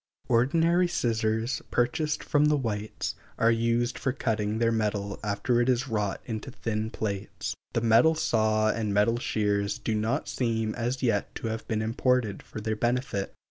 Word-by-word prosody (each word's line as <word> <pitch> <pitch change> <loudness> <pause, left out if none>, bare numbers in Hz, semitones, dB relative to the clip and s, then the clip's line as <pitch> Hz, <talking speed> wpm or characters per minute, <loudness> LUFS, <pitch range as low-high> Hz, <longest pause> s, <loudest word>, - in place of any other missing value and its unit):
Ordinary 165 +9 +3
scissors, 115 -3 0
purchased 145 +5 0
from 145 0 +3
the 150 0 +4
whites, 110 -5 -3 0.2
are 115 0 +4
used 115 +1 +1
for 135 - 0
cutting: 110 -5 -1
their 115 0 +2
metal 105 -2 -1
after 105 +4 +1
it 120 - +1
is 125 +1 +1
wrought 105 -4 -1
into 110 +2 -5
thin 110 -3 -3
plates. 100 -3 -4 0.2
The 115 - +1
metal 115 +8 +5
saw 110 -6 +2
and 105 -3 -2
metal 115 +3 +3
shears 105 -3 0
do 110 - -2
not 110 +2 0
seem 115 -3 -1
as 120 +3 -2
yet 115 -5 0
to 115 - -3
have 110 0 -5
been 110 -2 -1
imported 115 -2 +1
for - - -8
their 110 +1 -2
benefit. 120 -3 -1
115 Hz, 165 wpm, -28 LUFS, 110-125 Hz, 0.2 s, metal